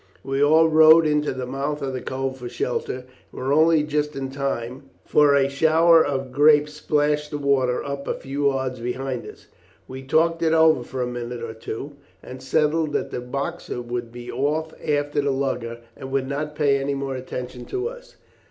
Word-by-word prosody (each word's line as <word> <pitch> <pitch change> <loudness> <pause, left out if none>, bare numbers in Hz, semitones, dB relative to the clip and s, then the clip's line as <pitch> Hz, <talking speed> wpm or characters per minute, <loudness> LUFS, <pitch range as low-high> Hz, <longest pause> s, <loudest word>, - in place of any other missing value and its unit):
We 135 +1 -2
all 160 +2 +5
rowed 160 +1 +7
into 150 -1 +1
the 130 -1 -4
mouth 140 +3 -3
of 135 -1 -3
the 130 - -4
cove 130 0 -3
for 125 -2 -7
shelter, 125 +1 -3
and - - -21 0.3
were 135 +2 0
only 160 0 +4
just 150 0 -2
in 135 -1 -4
time, 135 -1 -4 0.2
for 145 -1 +4
a 135 -1 +3
shower 160 +3 +4
of 135 -2 -3
grape 150 +2 +5
splashed 150 0 0
the 145 - -4
water 135 -3 +1
up 140 -1 -5
a - - -1
few 140 +1 -2
yards 130 -2 -3
behind 125 +1 -4
us. - - -13 0.4
"We 130 0 -8
talked 165 +5 +1
it 160 -1 +2
over 160 -4 +5
for 125 +1 -4
a - - -2
minute 120 -1 -5
or 115 -1 -5
two, 115 +5 -7 0.3
and 130 0 -9
settled 150 +3 +1
that - - -2
the 125 - -4
Boxer 125 0 -4
would 120 -1 -5
be 120 0 -8
off 155 +3 -1
after 145 -1 0
the 140 - -1
lugger 125 -4 -2
and 130 - -9
would 135 -1 0
not 150 +2 -4
pay 145 -2 +2
any 140 +1 -2
more 135 -1 -3
attention 125 -1 -6
to 390 +3 -3
us. - - -11
140 Hz, 195 wpm, -23 LUFS, 130-150 Hz, 0.4 s, rowed